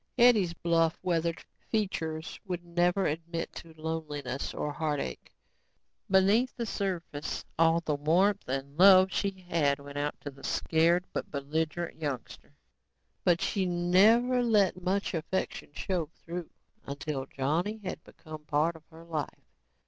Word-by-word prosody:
Hetty's 220 -8 +5
bluff, 165 -1 +2
weathered 170 -1 -1 0.2
features 160 -7 -2
would 180 -4 -5
never 175 +2 +2
admit 165 +2 -3
to 165 - -10
loneliness 150 -5 -3
or 150 - -3
heartache. 150 - -3 0.8
Beneath 200 +6 +3
the 235 - -2
surface, 180 -8 -3
all 165 0 +4
the 155 -3 -1
warmth 175 +8 +2
and 135 +3 -4
love 190 0 +8
she 190 -2 -2
had 145 -5 +2
went 145 0 -7
out 145 0 -2
to 145 - -6
the 135 0 -17
scared 170 +2 +2
but - - -3
belligerent 160 +4 -3
youngster. 140 -5 -5 0.7
But 170 -1 +3
she 190 -2 0
never 205 +9 +4
let 205 -6 +3
much 195 +3 0
affection 170 +3 -3
show 175 -4 -2 0.2
through 170 0 -5 0.4
until 140 -1 -4
Johnny 165 +12 -1
had 185 - -5
become 155 -2 -11
part 155 +3 +1
of 160 -1 -15
her 165 0 -14
life. 155 -4 -5
170 Hz, 135 wpm, -30 LUFS, 150-185 Hz, 0.8 s, love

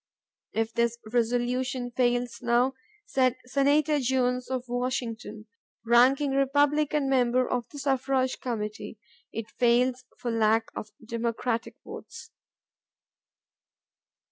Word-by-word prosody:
"If 225 0 -1
this 235 0 +1 0.2
resolution 245 +1 0
fails 245 -1 0
now," 245 +3 +2 0.3
said 255 -9 +1
Senator 285 +3 +2
Jones 250 -1 0
of 260 -1 -2
Washington, 245 -3 -3 0.4
ranking 260 +4 +4
Republican 285 +1 +2
member 255 -1 +2
of 245 -1 -2
the 290 - -11
Suffrage 265 -1 0
Committee, 215 -2 -4 0.3
"it 225 -1 -6
fails 250 +1 +2
for 240 - -3
lack 225 0 +2
of 215 - -6 0.2
Democratic 230 0 -2
votes." - - -10
250 Hz, 100 wpm, -27 LUFS, 235-265 Hz, 0.4 s, ranking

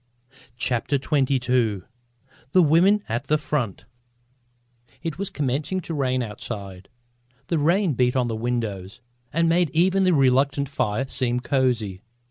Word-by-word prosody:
CHAPTER 120 +3 -1
XXII 125 - +1 0.7
THE 185 - +6
WOMEN 185 +7 +4
AT 120 +4 -3
THE 155 - +3
FRONT 125 -10 -3 1.2
It 165 +1 -4
was 200 - -2
commencing 145 +6 -2
to 165 - -6
rain 130 -3 0
outside. 100 -3 -7 0.6
The 165 - +1
rain 170 +3 +2
beat 125 0 +1
on 125 -2 +1
the 115 - -2
windows 110 -5 -3 0.3
and 165 +2 +2
made 170 0 +3
even 190 +3 +3
the 180 -2 +3
reluctant 135 +1 +2
fire 125 -3 -1
seem 125 -2 0
cosy. 120 -8 0
130 Hz, 130 wpm, -24 LUFS, 120-160 Hz, 1.2 s, THE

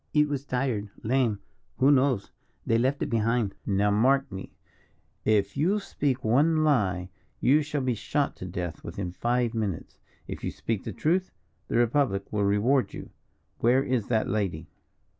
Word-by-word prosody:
"It 150 0 +5
was 140 -1 -3
tired, 125 -6 -1
lame, 115 -3 +1 0.4
who 135 +2 +5
knows? 130 -6 +2 0.3
they 115 0 +2
left 130 +4 +1
it - - -3
behind." 115 -2 +1
"Now, 100 +1 +2
mark 135 +6 +3
me, 95 0 -8 0.7
if 100 -2 +2
you 180 +9 +2
speak 140 -9 -2
one 155 +8 +3
lie, 95 -12 +1 0.3
you 145 +4 +4
shall 150 -1 -2
be 130 -1 +1
shot 140 +6 -1
to - - -7
death 85 -1 -5
within 90 +1 -5
five 120 +5 0
minutes. 105 -7 -4 0.3
If - - -7
you - - -1
speak 110 -4 -3 0.2
truth, 180 +4 +1 0.4
the - - 0
Republic 120 -5 +1
will 105 -1 +1
reward 105 +4 +2
you. - - -9 0.5
Where 125 +3 +3
is 125 -6 -1
that 110 -2 +1
lady?" 105 -4 -2
120 Hz, 160 wpm, -27 LUFS, 100-140 Hz, 0.7 s, It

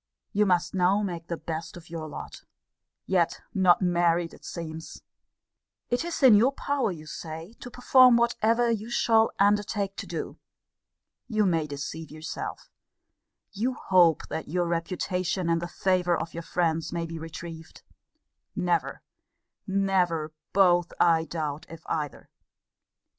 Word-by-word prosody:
You 210 0 +3
must 175 -1 +1
now 190 +2 +2
make 170 -4 -4
the 170 - -3
best 165 +2 -6
of 170 -1 -14
your 160 -2 -5
lot. 150 - -9 0.6
Yet 175 -3 +1
not 185 -2 +4
married, 175 -1 +2
it - - -16
seems! 160 -1 -7 0.9
It 245 +5 +1
is 340 -4 -4
in 255 -4 +9
your 230 +6 +5
power, 280 -6 -1
you 155 -3 -9
say, 160 +5 -7
to 245 - -8
perform 250 0 +6
whatever 235 0 +2
you 220 0 -3
shall 225 -1 +3
undertake 205 0 +1
to - - -6
do. - - -5 0.9
You 215 -3 +1
may 165 -4 +1
deceive 145 +2 -6
yourself: 155 +1 -7 0.8
you 235 +6 -1
hope 175 -4 +3
that 160 - -4
your 175 +2 0
reputation 175 +1 -1
and 165 0 +1
the 170 - -3
favour 180 -1 +1
of 160 0 -5
your 170 - -5
friends 165 -1 -1
may 170 -1 -2
be 165 0 -6
retrieved. 165 0 -9 0.7
Never, - - -1 0.6
never, 185 -5 +1 0.2
both, 175 -3 +3
I 165 -1 +4
doubt, 155 -3 -4
if 165 -1 -11
either. 150 -3 -4
175 Hz, 140 wpm, -27 LUFS, 165-205 Hz, 0.9 s, in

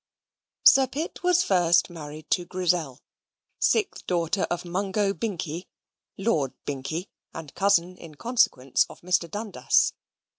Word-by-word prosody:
Sir 270 -1 +7
Pitt 300 +9 -5
was 360 -1 +3
first 175 -3 +3
married 155 -3 -9
to 180 - +2
Grizzel, 175 -6 -1 0.6
sixth 425 -3 0
daughter 175 +2 0
of 175 0 -3
Mungo 195 +3 0
Binkie, 180 -6 -4 0.5
Lord 160 - 0
Binkie, 145 +6 -4 0.3
and 160 -3 -8
cousin, 185 -2 +2
in 160 -3 -12
consequence, 215 - +1
of - - -13
Mr. 180 -1 0
Dundas. 210 +3 +1
180 Hz, 120 wpm, -26 LUFS, 160-205 Hz, 0.6 s, Sir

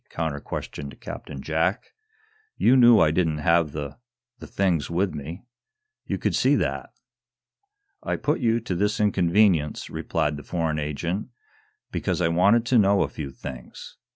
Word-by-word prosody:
counter 80 -3 -3
questioned 70 0 -7
Captain 65 - -8
Jack. 80 +5 -1 0.6
"You 130 - +4
knew 120 -3 +7
I 75 - +4
didn't 80 -2 +1
have 80 0 +2
the 75 - -6 0.4
the - - -9
things 90 -6 0
with 90 +3 0
me. 80 +6 -7 0.6
You - - -1
could - - -1
see - - +3
that." - - -2 1.1
"I - - -2
put 150 - -1
you 115 -2 +2
to 110 -4 -3
this 105 +4 0
inconvenience," 95 -5 +2
replied 75 -3 -1
the 75 - -9
foreign 80 -3 -2
agent, 85 +6 -3 0.6
"because - - -2
I 85 -2 +2
wanted 100 +8 +3
to 120 0 +4
know 100 -1 +4
a - - -3
few 75 -3 -6
things. 65 -2 -10
85 Hz, 155 wpm, -25 LUFS, 75-100 Hz, 1.1 s, knew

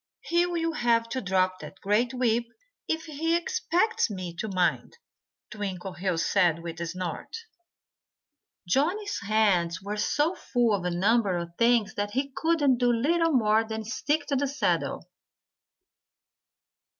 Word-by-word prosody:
"He'll 340 -1 0
have 230 -5 +1
to 260 +2 -2
drop 185 -1 +1
that 190 - -10
great 215 +5 +1
whip 240 -2 +1 0.4
if 320 0 -2
he 325 +2 -1
expects 445 - 0
me 185 -4 -6
to 220 - -3
mind," 185 - -1 0.5
Twinkleheels 185 -4 -3
said 175 -5 +3
with 165 0 -6
a 170 - -2
snort. 180 - -5 1.3
Johnnie's 360 - 0
hands 200 -5 +1
were 205 +2 -5
so 295 - +1
full 240 - 0
of 190 -3 -1
a - - +1
number 195 +2 +2
of 170 0 -5
things 230 -2 +3
that 205 0 -2
he 275 +3 -1
could 295 -6 +2
do 245 -1 +3
little 330 +8 +2
more 220 -3 +3
than 220 0 -5
stick 290 +7 -1
to 285 - -1
the 280 +1 +1
saddle. 280 +2 -1
230 Hz, 140 wpm, -27 LUFS, 190-290 Hz, 1.3 s, said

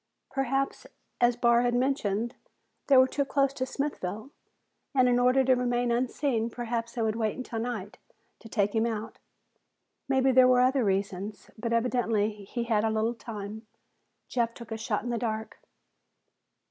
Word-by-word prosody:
Perhaps, 270 0 -1 0.3
as 240 0 +4
Barr 235 0 +4
had 245 0 +1
mentioned, 240 -3 0 0.5
they 275 - +6
were 260 0 +7
too 280 +2 0
close 275 0 +1
to 260 -2 -3
Smithville, 260 -5 -4 0.6
and 255 -1 +5
in 245 0 +3
order 250 +2 +4
to 260 0 +4
remain 245 -1 0
unseen, 240 -1 0
perhaps 235 -1 -3
they 235 - -1
would 220 -1 0
wait 220 -2 -1
until 245 -3 -4
night 225 -4 -4 0.4
to 225 - -13
take 205 -2 +1
him 225 0 +2
out. 220 -1 -5 0.9
Maybe 265 -1 +3
there 255 0 +7
were 250 0 +5
other 260 0 +3
reasons, 195 +1 -2
but 230 +1 -4
evidently 230 -3 +1
he 235 +4 -3
had 220 -3 +1
a 225 - +2
little 220 +2 0
time. 215 -1 -8 0.6
Jeff 235 -2 -1
took 235 -1 -11
a - - -1
shot 215 -1 -1
in 240 - -3
the 235 - -1
dark. 220 -2 -4
235 Hz, 165 wpm, -28 LUFS, 220-255 Hz, 0.9 s, were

